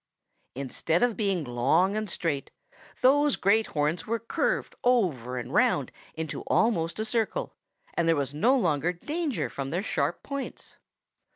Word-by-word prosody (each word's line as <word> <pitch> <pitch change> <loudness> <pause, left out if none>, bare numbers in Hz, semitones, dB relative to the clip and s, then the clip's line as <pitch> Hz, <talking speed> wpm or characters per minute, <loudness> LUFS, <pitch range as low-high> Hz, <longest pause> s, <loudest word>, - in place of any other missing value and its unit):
"Instead 140 - 0
of 245 -3 +2
being 195 -6 0
long 140 +10 +2
and 215 -1 -2
straight, 160 -5 -2 0.5
those 285 +2 +5
great 215 +3 +3
horns 155 +3 -1
were 230 +1 +1
curved - - -1
over 160 - +1
and - - -5
round - - +2 0.2
into 160 -1 -4
almost 170 -8 +2
a 220 - -1
circle, 235 - -1 0.4
and 165 - +1
there 165 - +5
was 140 -1 -2
no 230 - +3
longer 170 - +1
danger 300 - -2
from 135 -1 -5
their 175 +6 -1
sharp 150 -5 -1
points. 280 -1 -6
180 Hz, 150 wpm, -27 LUFS, 150-235 Hz, 0.5 s, those